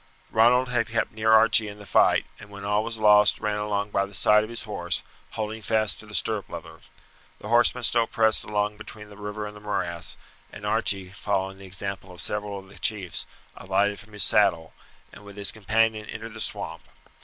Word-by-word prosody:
Ronald 125 +3 +4
had 120 -2 +1
kept 115 -1 -1
near 110 +1 +1
Archie 110 0 +5
in 105 0 -8
the 105 - -12
fight, - - +3
and 105 - -12
when 100 -1 -9
all 105 +1 +1
was 115 0 -5
lost 105 -1 +5
ran 105 -1 -1
along 105 0 -2
by 100 0 +1
the 100 - -12
side 105 +4 +4
of 110 - -7
his 115 - -5
horse, 85 -5 -2 0.3
holding 110 0 -4
fast 110 0 0
to 110 - -12
the 105 - -6
stirrup 105 -5 -1
leather. - - -9 0.6
The 105 - -8
horsemen 120 +1 +4
still 115 +1 +3
pressed 110 -1 +2
along 105 0 -1
between 105 -1 -11
the - - -12
river 105 +1 -5
and 105 0 -8
the 105 - -12
morass, 90 -5 -3 0.3
and 105 - -9
Archie, 100 -3 0
following 95 -1 -2
the 95 0 -11
example 95 0 -5
of 90 - -11
several 105 +1 -1
of 95 0 -11
the 100 - -14
chiefs, 100 -6 -1 0.3
alighted 100 +2 0
from 110 0 -15
his 105 -3 +2
saddle, 80 -1 +3 0.4
and - - -13
with 100 0 -12
his 100 -1 +3
companion 110 0 0
entered 115 -1 -7
the 110 - -6
swamp. - - -4
105 Hz, 205 wpm, -25 LUFS, 100-110 Hz, 0.6 s, Archie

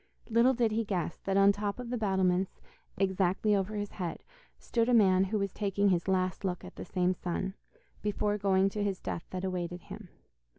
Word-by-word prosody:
Little 235 +3 +5
did 230 -2 +2
he 225 +1 +1
guess 185 -5 -2
that 195 0 +1
on 195 0 +7
top 205 0 -3
of 245 -1 -6
the - - 0
battlements, 190 -3 +1 0.4
exactly 195 +2 +2
over 200 +2 -1
his 205 -1 -3
head, 175 -4 -5 0.3
stood 230 0 0
a 245 - +5
man 190 -3 +5
who 210 +3 -1
was 200 -2 -2
taking 200 -1 +1
his 175 -1 +1
last 185 -1 0
look 180 -2 -2
at - - -11
the - - -7
same 180 +1 +1
sun, 185 +2 -3 0.5
before 210 0 0
going 195 -1 +3
to 205 +1 -3
his 195 -2 -1
death 170 - -5
that 185 0 -4
awaited 180 -1 -3
him. 200 -1 -10
195 Hz, 200 wpm, -30 LUFS, 185-210 Hz, 0.5 s, on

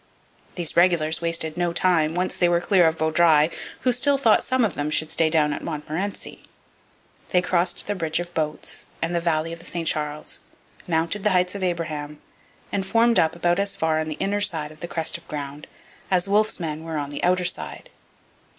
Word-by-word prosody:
These 175 -4 -3
regulars 170 -2 +3
wasted 165 -2 0
no 175 -1 0
time, 165 -3 +2
once 180 +1 -1
they 175 - +2
were 170 0 +3
clear 180 -1 +4
of 160 0 0
Vaudreuil, 160 -1 +4 0.3
who 255 - +2
still 275 +3 +3
thought 235 -6 +4
some 255 -2 +1
of 205 - -2
them 145 +1 -2
should 155 +1 0
stay 160 -1 +2
down 150 -2 +2
at - - -6
Montmorency. 160 +6 -5 0.9
They 180 - +3
crossed 175 0 0
the 205 - -1
bridge 165 -4 0
of 175 0 -6
boats 155 -2 -3
and 165 +1 -2
the 170 - 0
valley 165 -1 0
of 165 - -9
the - - -13
St 170 -2 -1
Charles, 150 -1 -2 0.5
mounted 170 +4 0
the 210 - +3
Heights 180 -1 +2
of 200 - -6
Abraham, 155 -4 -3 0.5
and 200 - -1
formed 230 +4 +3
up 160 0 +2
about 175 +1 +1
as 200 0 0
far 160 -1 +1
on 155 - -2
the 155 - -4
inner 205 +4 -1
side 155 -6 0
of 155 - -15
the 175 - -5
crest 165 0 -1
of 170 - -25
ground 145 -1 -6 0.4
as 185 0 +2
Wolfe's 210 +1 +2
men 160 -2 -4
were 165 -1 -4
on 145 -1 -4
the 145 - -6
outer 180 0 +2
side. - - -3
170 Hz, 205 wpm, -23 LUFS, 155-185 Hz, 0.9 s, clear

